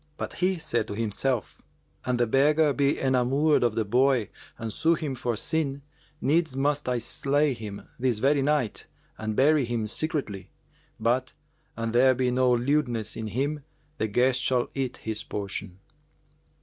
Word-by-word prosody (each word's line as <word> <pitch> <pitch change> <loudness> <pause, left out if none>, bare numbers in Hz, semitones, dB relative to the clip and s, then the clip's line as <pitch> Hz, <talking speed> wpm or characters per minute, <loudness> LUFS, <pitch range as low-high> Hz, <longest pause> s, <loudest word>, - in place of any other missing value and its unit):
But - - -5
he 185 +1 +2
said 120 -9 -2
to 100 - -5
himself, 115 +3 -2 0.4
"An 125 -1 0
the 120 - +3
beggar 145 +5 +3
be 140 +1 +1
enamoured 135 +4 +2
of 120 -3 +1
the 110 - 0
boy 125 0 +2 0.3
and 110 -1 -5
sue 165 +1 +2
him 155 -4 -3
for 120 -2 -2
sin, 140 +2 -1 0.4
needs 160 -1 +1
must 145 0 0
I 125 - +1
slay 140 +4 0
him 105 -4 -8
this 125 -3 +1
very 140 +5 +2
night 140 -5 0 0.3
and 110 -1 -3
bury 145 +3 +4
him 120 -2 -2
secretly. 105 - -3 0.5
But, 120 +3 0 0.4
an 115 0 -2
there 130 +2 +5
be 125 0 +1
no 125 0 +3
lewdness 120 -2 0
in 110 -1 -4
him, 140 +7 -2 0.4
the 110 - +1
guest 125 +4 +2
shall 125 -2 +1
eat 130 -2 -3
his 110 -1 -4
portion." 100 -4 -5
130 Hz, 160 wpm, -27 LUFS, 115-145 Hz, 0.5 s, there